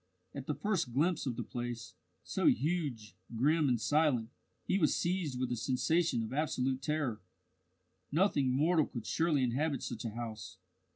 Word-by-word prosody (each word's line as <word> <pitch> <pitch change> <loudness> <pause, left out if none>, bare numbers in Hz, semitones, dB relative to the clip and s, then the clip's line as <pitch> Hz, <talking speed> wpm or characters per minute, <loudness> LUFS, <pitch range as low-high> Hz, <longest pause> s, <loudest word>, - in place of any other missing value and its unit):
At - - -7
the - - -1
first 190 - -1
glimpse 155 +3 +1
of 125 - -1
the - - -3
place, 120 -1 -5 0.3
so - - 0
huge, 135 - 0 0.2
grim, 150 +5 +3
and 120 -2 +2
silent, 135 -4 +2 0.3
he 195 - +1
was 155 -5 +3
seized 170 -7 -1
with 130 -1 -1
a - - +1
sensation 130 +3 +1
of 110 - -5
absolute 135 -3 0
terror. 135 -7 -1 0.9
Nothing 150 -5 +3
mortal 155 +4 +3
could 120 -3 -7
surely 160 -5 +2
inhabit 135 +3 0
such 110 - -5
a 115 - -2
house. 115 -2 -6
135 Hz, 160 wpm, -33 LUFS, 120-160 Hz, 0.9 s, grim